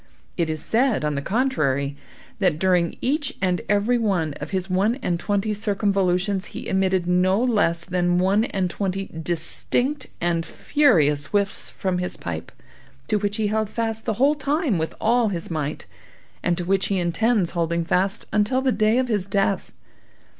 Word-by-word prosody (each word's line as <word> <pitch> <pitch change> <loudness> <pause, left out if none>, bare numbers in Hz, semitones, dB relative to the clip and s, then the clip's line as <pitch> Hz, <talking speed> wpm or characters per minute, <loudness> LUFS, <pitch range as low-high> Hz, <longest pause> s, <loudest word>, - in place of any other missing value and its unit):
It 170 -2 0
is 155 -1 -3
said, 235 - +1
on 150 - 0
the 140 - -2
contrary, 145 - 0 0.4
that 180 -6 +2
during 180 -1 +1
each 285 +2 -1
and 180 -3 0
every 210 +4 +2
one 180 -9 0
of - - -5
his 190 -1 -2
one 195 +5 +1
and 175 -1 0
twenty 205 +2 0
circumvolutions 195 -2 0
he - - -6
emitted 190 -1 +1
no 180 +2 +3
less 205 -9 +1
than 175 -1 +1
one 195 +4 +3
and 190 -6 -1
twenty 195 +1 -3
distinct 245 - 0
and 170 -1 0
furious 150 - +2
whiffs 200 -1 -1
from 185 -2 -2
his 180 - -4
pipe, - - -6 0.6
to 215 - +3
which 205 0 -2
he 220 - 0
held 220 -1 0
fast 225 -1 -3
the 225 - 0
whole 275 +6 +4
time 290 - 0
with 160 - -3
all 235 +1 +3
his 170 -3 -4
might, 155 -2 -3 0.6
and 175 -1 0
to 175 - -3
which 195 +1 +1
he 200 - 0
intends 185 +2 +1
holding 170 0 -1
fast 190 +5 0
until 235 +5 +2
the 265 - +3
day 215 0 +2
of 260 0 +1
his 205 -5 -1
death. 195 0 0
195 Hz, 170 wpm, -23 LUFS, 175-220 Hz, 0.6 s, whole